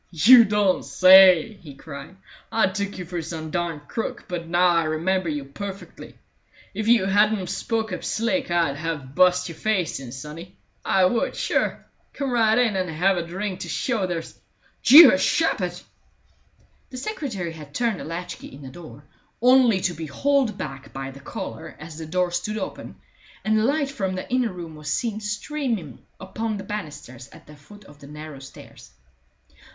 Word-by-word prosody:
"You 220 - +7
don't 205 -2 +1
say!" 185 +1 +6
he 145 -5 -12
cried. 140 +5 -10 0.4
"I 220 -4 +2
took 200 +1 -4
you 180 - -6
for 175 0 -4
some 160 -1 -6
darned 165 -4 -3
crook, 225 - -5
but 170 -2 -5
now 175 +2 +3
I 170 -2 +2
remember 170 +3 -1
you 145 -2 -4
perfectly. 195 +8 -9 0.6
If 215 +2 -3
you 230 -5 +4
hadn't 205 0 +2
've - - -8
spoke 220 -3 -2
up - - -5
slick 235 +3 -1
I'd 170 -5 +1
have 150 -4 -5
bu'st 180 +2 +3
your 165 -2 -9
face 195 -9 -1
in, 130 -3 -9
sonny. 155 +7 -9 0.3
I 190 -1 +3
would, 230 +5 0
sure! - - -1 0.3
Come 275 -2 -3
right 225 -2 +3
in, 240 -4 +2
and 185 -1 -1
have 180 +5 +1
a 175 - -1
drink 185 +3 -5
to - - -6
show 225 -7 -1
there's 170 -2 -5 0.5
Jeehoshaphat!" 225 - +6 1.1
The 255 - -9
secretary 250 - -4
had 155 -3 -11
turned 230 -5 0
the - - -6
latch 170 +2 -6
key - - -11
in 140 - -13
the 130 - -8
door, 150 0 -12 0.4
only 245 -5 +5
to 175 - 0
be 160 0 -7
hauled 270 - +1
back 135 -2 -7
by 135 0 -6
the 135 - -13
collar 115 -4 -7
as 155 +1 -10
the 160 - -7
door 180 +2 0
stood 195 +5 -3
open, 195 - -6 0.5
and 215 0 +2
the 215 - +1
light 280 +1 0
from 195 -9 -3
the 185 - -6
inner 250 -4 +1
room 170 -3 -8
was 150 -1 -6
seen 220 +1 -1
streaming 210 - -4 0.2
upon 215 +3 -4
the 195 - -7
banisters 150 - -8
at 160 +1 -16
the 150 - -14
foot 205 +8 -16
of 145 -3 -17
the 140 - -13
narrow 150 -1 -9
stairs. 135 - -14
185 Hz, 180 wpm, -23 LUFS, 155-215 Hz, 1.1 s, You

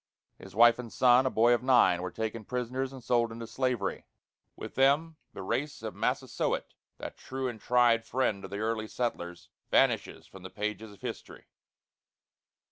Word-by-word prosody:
His 95 0 -12
wife 120 +1 +6
and 120 -3 -7
son, 125 +1 +5
a - - +2
boy 120 0 +4
of 120 - +1
nine, 125 -9 +4
were 90 - -3
taken 110 +3 -4
prisoners 125 +3 -3
and 130 -2 -11
sold 120 -1 +1
into 115 0 -7
slavery. 120 -3 -2 0.5
With - - -8
them, 145 +4 +2 0.2
the 95 - -7
race 145 +9 -3
of - - -4
Massasoit, - - -2 0.2
that - - -8
true 130 0 -4
and 115 -4 -6
tried 120 -2 +3
friend 115 -6 -1
of 95 - -7
the 100 - -5
early 110 0 -2
settlers, 90 -8 -4 0.2
vanishes - - +2
from 95 - -14
the 95 - -8
pages 105 +1 -4
of 100 - -17
history. - - -7
115 Hz, 170 wpm, -29 LUFS, 105-125 Hz, 0.5 s, wife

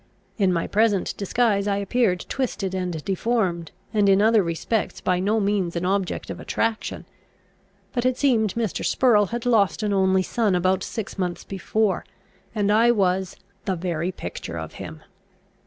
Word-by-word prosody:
In 195 -2 +3
my 170 -2 0
present 210 -2 +1
disguise 205 0 +1
I 200 -1 +1
appeared 200 -2 +1
twisted 215 -8 -2
and 180 -4 -3
deformed, 190 -4 -1 0.2
and 205 -2 +3
in 195 0 +5
other 220 +1 +5
respects 175 +5 -2
by 180 -1 +1
no 210 +4 +1
means 200 -4 0
an 170 +1 -1
object 195 0 -1
of - - -7
attraction. 225 -1 -2 0.9
But 245 0 +1
it 255 0 0
seemed 230 -8 +2
Mr. 230 -5 -2
Spurrel 215 -6 +3
had 235 +3 -4
lost 215 -6 +2
an 205 -1 0
only 190 -1 +3
son 210 0 +1
about 185 +1 +2
six 205 0 -5
months 180 -2 -2
before, 200 +2 -1 0.5
and 205 -1 +1
I 225 +3 +5
was 190 -4 +1 0.3
"the 190 -3 0
very 175 0 -2
picture - - -6
of - - -6
him." - - -8
200 Hz, 160 wpm, -24 LUFS, 185-220 Hz, 0.9 s, in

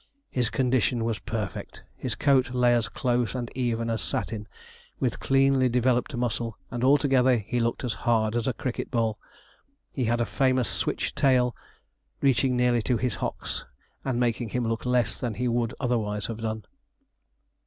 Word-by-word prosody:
His 125 -3 +1
condition 125 -4 +1
was 115 -2 -1
perfect. 105 -5 -5
His - - -3
coat 130 -3 +2
lay 125 -1 +4
as 115 -2 +1
close 125 -1 0
and 120 -2 -4
even 115 -3 -1
as 115 -2 -1
satin, 105 -2 -3 0.5
with - - -1
cleanly 135 -1 +3
developed 125 +1 +1
muscle, 115 -2 -2
and 120 0 -3
altogether 130 -2 +4
he 115 +3 -2
looked 115 +2 -1
as 120 -3 -1
hard 110 -1 +2
as 120 0 0
a 130 - +1
cricket 125 0 -4
ball. 115 -3 0 0.7
He 130 - -1
had 120 +1 +1
a 120 - +2
famous 130 +4 +2
switch - - -1
tail, 125 -4 +3 0.6
reaching 130 -2 +2
nearly 125 -1 +3
to 120 +2 +1
his 125 -1 -1
hocks, - - -3 0.4
and 130 -3 -1
making 120 -1 0
him 120 +1 -1
look 115 +2 -2
less 125 -1 +1
than 120 -4 -2
he 125 +3 -1
would 120 -1 0
otherwise 110 -5 -1
have 115 - -4
done. 110 -1 -4
120 Hz, 165 wpm, -27 LUFS, 115-125 Hz, 0.7 s, lay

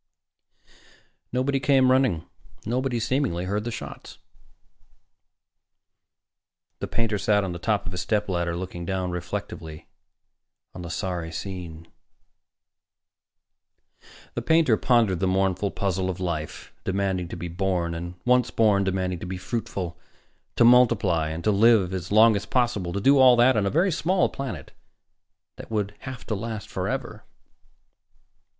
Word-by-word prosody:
Nobody 130 +2 0
came 135 -2 +4
running. 130 -11 +2 0.4
Nobody, 125 +2 -1
seemingly, 115 -8 -1
heard 105 +3 -2
the - - -2
shots. 115 - -8 2.6
The - - -4
painter 115 -3 -1
sat 105 0 +2
on 95 - -3
the 85 - -6
top 105 +1 0
of 90 - -5
his 90 0 -3
stepladder, 90 -6 -1
looking 90 -1 -6
down 95 0 -2
reflectively 80 -2 -6 0.8
on 90 - -8
the 85 - -7
sorry 85 -2 -3
scene. 85 -3 -7 2.5
The - - -3
painter 160 -8 +4
pondered 115 -6 +2
the 95 - +1
mournful 95 +1 +1
puzzle 95 -1 -2
of 90 0 -4
life 85 -4 -4
demanding 95 -2 -1
to - - -7
be 85 - -5
born 90 -1 -1
and, 85 +1 -6
once 125 -1 +3
born, 105 -3 +3
demanding 95 -2 -1
to - - -7
be 95 0 -4
fruitful... 95 -4 -4 0.6
to 115 - +5
multiply 110 -10 +4
and 80 +2 -5
to 105 - +3
live 100 -3 +4
as 90 -1 -5
long 110 +1 +6
as 100 +1 -3
possible 115 -9 0
to 100 - -2
do 135 +5 +5
all 130 -2 +8
that 120 +2 +5
on 105 -2 +1
a - - +2
very 175 - +2
small 180 +3 +1
planet 135 -4 -6 0.9
that - - -10
would 105 -2 -2
have 130 -2 -8
to - - -3
last 110 0 -5
forever. - - -4
100 Hz, 140 wpm, -25 LUFS, 90-120 Hz, 2.6 s, all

